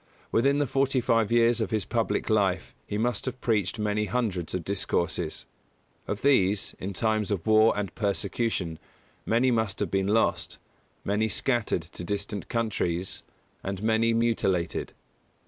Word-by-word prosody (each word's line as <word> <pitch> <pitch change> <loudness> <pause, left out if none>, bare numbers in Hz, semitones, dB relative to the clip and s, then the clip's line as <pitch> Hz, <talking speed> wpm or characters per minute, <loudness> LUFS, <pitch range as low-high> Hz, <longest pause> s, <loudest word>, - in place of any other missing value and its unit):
Within 140 +5 +3
the 145 - +2
forty 135 0 +1
five 115 -3 +2
years 120 0 +4
of 110 - -1
his 110 -4 -1
public - - -1
life - - +1
he 105 - -2
must 120 +3 0
have 130 0 -4
preached 105 -6 0
many 105 0 0
hundreds 100 -6 -2
of 90 - -2
discourses. 90 -4 -1 0.6
Of 100 - -4
these, 105 -8 +3
in 95 - -4
times 110 +1 0
of 100 -5 -2
war 110 0 +5
and 100 -2 -3
persecution, 100 -4 -1 0.5
many 120 +3 +3
must 110 -4 0
have - - -1
been 95 0 +1
lost, 110 +2 +1 0.5
many 105 +2 +1
scattered 120 -8 0
to 85 +2 -9
distant 100 0 -3
countries, 95 -6 -1 0.4
and 95 +1 -4
many 110 +1 +3
mutilated. 100 -8 0
105 Hz, 145 wpm, -27 LUFS, 95-115 Hz, 0.6 s, war